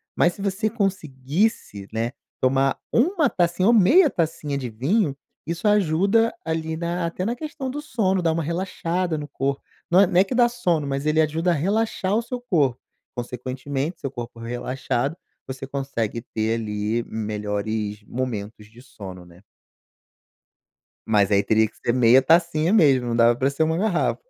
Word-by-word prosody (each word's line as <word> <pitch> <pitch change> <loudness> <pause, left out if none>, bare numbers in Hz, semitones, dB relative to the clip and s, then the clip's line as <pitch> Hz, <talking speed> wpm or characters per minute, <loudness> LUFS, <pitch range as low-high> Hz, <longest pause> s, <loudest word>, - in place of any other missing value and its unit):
Mas 175 - +3
se 195 - -8
você 200 +2 0
conseguisse, 165 - -1
né, 115 +2 -2 0.3
tomar 135 +1 +2
1 310 - +3
tacinha 175 0 +1
ou 235 - +6
meia 275 - +6
tacinha 155 -4 -2
de 130 -3 -4
vinho, 140 - 0 0.3
isso 170 +5 -4
ajuda 205 +3 +3
ali 160 0 -2
na 170 +1 -2
até 180 +2 -4
na 235 +3 -1
questão 300 -1 -5
do 295 +3 -5
sono, 195 -10 0
dá 165 -2 +2
uma 165 0 -1
relaxada 170 0 -2
no 145 -1 -6
corpo. 140 +1 -2 0.3
Não 180 +3 +6
é - - +7
não 180 0 +3
é - - +7
que 250 - -4
dá 240 -1 +5
sono, 175 -11 0
mas 140 +1 -3
ele 155 +1 +3
ajuda 160 +3 +1
a - - +3
relaxar 195 +4 0
o 225 - +2
seu 250 +1 -5
corpo. 150 - +1 0.4
Consequentemente 130 +6 -4
seu 135 - -4
corpo 120 -2 -8
relaxado, 125 +4 -2 0.3
você 135 0 -6
consegue 135 -5 -3
ter 110 -1 -2
ali 105 +1 -2
melhores 105 0 -3
momentos 110 -3 -5
de 115 +2 -16
sono, 95 -8 -10
né. 85 +1 -18 1.7
Mas 105 -2 +3
aí 100 -1 +4
teria 110 0 +2
que - - -27
ser 120 - -1
meia 125 +1 +5
tacinha 165 +3 +3
mesmo, 135 - +4
não 115 - -1
dava 120 0 +5
para 130 +3 +1
ser 140 +3 -1
1 160 +1 +1
garrafa. 190 -1 0
150 Hz, 170 wpm, -23 LUFS, 120-185 Hz, 1.7 s, é